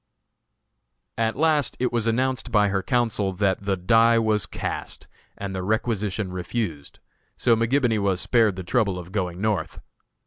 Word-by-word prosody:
At 110 0 +1
last 150 -2 +1
it 125 -1 0
was 115 -1 0
announced 125 0 0
by 105 -2 +3
her 95 -1 0
counsel 110 -3 0
that 95 0 0
the 100 -1 -1
"die 115 +5 +4
was 110 -2 +1
cast," - - -5 0.3
and 100 -1 -5
the 95 - -3
requisition 105 -1 -1
refused; 90 -5 -4 0.4
so 115 - +3
McGibony 115 0 +1
was 95 -2 +1
spared 110 -3 +2
the 95 - -6
trouble 100 -1 0
of 90 0 -9
going 90 -3 -3
North. 105 -4 -1
105 Hz, 150 wpm, -24 LUFS, 95-115 Hz, 0.4 s, die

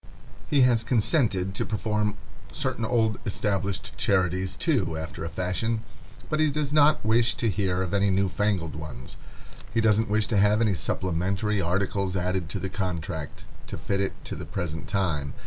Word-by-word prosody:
He 145 -2 +3
has 120 -3 +4
consented 110 - +2
to - - -1
perform 105 -1 -1 0.3
certain - - -2
old 110 -2 +1
established 100 -1 -2
charities, 95 -2 +1
too, 100 - +1
after 80 0 -5
a 85 - -3
fashion, 110 +6 -1 0.4
but 155 - -1
he 155 -1 +4
does 145 0 -2
not 150 -4 +4
wish 115 +2 +3
to 115 - 0
hear 95 -2 0
of 95 - -4
any 100 0 +3
new 95 +1 +2
fangled 95 -5 0
ones; 75 -5 -8 0.6
he 115 - +1
doesn't 110 0 +3
wish 105 0 +2
to 110 - +1
have 105 +2 +4
any 110 -3 +3
supplementary 95 +4 0
articles 95 +2 0
added 90 -2 -1
to - - -3
the 95 - -3
contract, 85 -6 -4 0.2
to - - -5
fit 100 0 -1
it 95 - -1
to - - -5
the - - -6
present 80 -2 -4
time. 80 -9 -1
100 Hz, 170 wpm, -26 LUFS, 90-110 Hz, 0.6 s, has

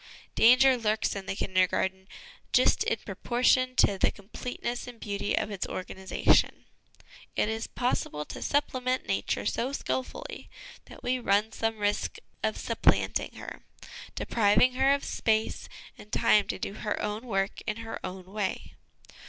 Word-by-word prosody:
Danger 255 +3 +6
lurks 215 -1 0
in 195 -2 -6
the - - -2
Kindergarten, 190 0 0 0.5
just - - +4
in - - 0
proportion 255 +1 +2
to 195 -5 +3
the - - +4
com 200 0 -13
pleteness 245 0 -4
and 245 -2 -10
beauty 200 -1 -2
of 210 - -1
its 195 -3 -3
organisation. 190 +1 +1 0.7
It 210 - +1
is 220 0 -3
possible 195 - -2
to - - -8
supplement 255 -3 0
Nature - - -1
so 255 +3 -1
skilfully 260 -2 -4 0.4
that - - -14
we 255 +1 0
run 210 -1 +2
some 225 0 -1
risk 205 0 -1 0.2
of - - -1
supplanting - - +1
her, - - -8 0.5
depriving 210 +3 +3
her 265 +2 +3
of 280 0 +1
space 220 -1 0 0.3
and 210 - -13
time 210 -1 +4
to - - -2
do 195 - -4
her 210 - -2
own 210 +4 -3
work 195 -3 -1
in - - -1
her 225 - -6
own 185 0 -6
way. 195 +1 -4
220 Hz, 150 wpm, -28 LUFS, 200-250 Hz, 0.7 s, Danger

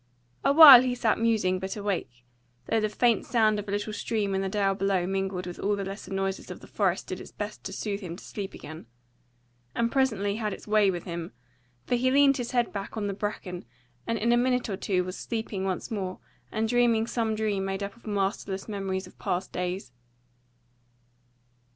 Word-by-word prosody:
A - - +4
while 285 -4 +11
he 250 -1 0
sat 225 -3 +1
musing 215 -5 +2
but 190 +2 -4
awake, 180 -12 -3 0.4
though 225 - +1
the 215 0 0
faint 235 +2 +2
sound 220 -3 +2
of 205 - -6
a - - -4
little 205 +1 -2
stream 210 -2 -1
in 190 - 0
the 195 - -1
dale 195 -1 +1
below 195 -2 0
mingled 190 -1 -2
with 175 -1 -7
all 205 +1 +1
the 200 -1 -4
lesser 195 0 -7
noises 195 0 -2
of - - -7
the - - -13
forest - - 0
did - - -6
its - - -11
best - - -6
to - - -4
soothe 200 -2 -3
him 175 -3 -6
to - - -12
sleep 200 -2 -6
again: 155 -3 -10 0.9
and 235 0 +1
presently 215 -7 +1
had 215 -3 -2
its - - -10
way 210 -1 +4
with 175 -3 -3
him; 170 -5 -6 0.5
for - - -2
he 250 +1 +2
leaned 275 0 +5
his 245 -2 -3
head 240 -2 0
back 200 +2 -5
on 210 - -1
the 200 - -1
bracken, 195 -3 -4 0.4
and 230 - 0
in 230 +3 +1
a 240 - +5
minute 250 -1 +1
or 195 - -1
two 185 -1 0
was 185 +1 -6
sleeping 220 -4 -4
once 190 +5 -3
more 190 -4 -3 0.3
and 220 +1 0
dreaming 235 -1 +3
some 225 -2 -1
dream 210 -3 -1
made 195 +1 -3
up 200 - -5
of 235 - -17
masterless 195 -1 -2
memories 195 -3 -3
of - - -17
past 180 +2 -2
days. 180 -6 -3
205 Hz, 205 wpm, -27 LUFS, 190-225 Hz, 0.9 s, while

